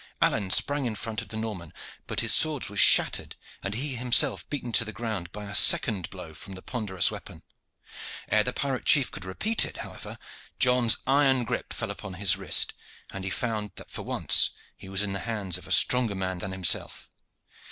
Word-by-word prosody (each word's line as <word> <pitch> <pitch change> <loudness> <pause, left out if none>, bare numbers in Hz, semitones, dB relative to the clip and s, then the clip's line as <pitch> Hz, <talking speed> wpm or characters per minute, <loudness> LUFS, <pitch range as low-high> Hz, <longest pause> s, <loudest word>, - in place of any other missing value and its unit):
Alleyne 100 -4 +1
sprang 145 +6 +2
in 110 - -4
front 110 +1 -5
of - - -12
the 110 - -7
Norman, 105 -7 -6 0.4
but - - -2
his - - +5
sword 150 -8 +3
was 100 -1 -2
shattered - - +4 0.3
and 100 - -5
he 135 +4 -3
himself 125 - +2
beaten 130 -5 -5
to 115 - +4
the 110 - -7
ground 105 -6 -5
by 105 +1 -8
a 100 - -8
second 100 -3 +3
blow 90 -4 -10
from 95 +5 -11
the 95 - -11
ponderous 105 -7 0
weapon. - - -10 0.8
Ere 105 +1 +2
the 125 - -2
pirate 135 0 -3
chief 140 -5 +3
could 95 - -8
repeat 215 - 0
it, - - -6
however, - - -10 0.4
John's 125 -2 +4
iron 135 -2 +3
grip 115 - -5
fell - - -4
upon 95 - -9
his 95 -1 +3
wrist, - - 0 0.4
and 95 - -7
he 95 - -3
found 105 -2 -3
that - - -12
for - - -6
once - - +3 0.3
he 95 - -13
was 95 +1 -1
in 100 -1 -3
the 100 - -3
hands 105 -6 -2
of - - -14
a - - -10
stronger 125 -5 +4
man 95 -1 -3
than 95 - -6
himself. 95 -3 -2
110 Hz, 200 wpm, -26 LUFS, 95-125 Hz, 0.8 s, his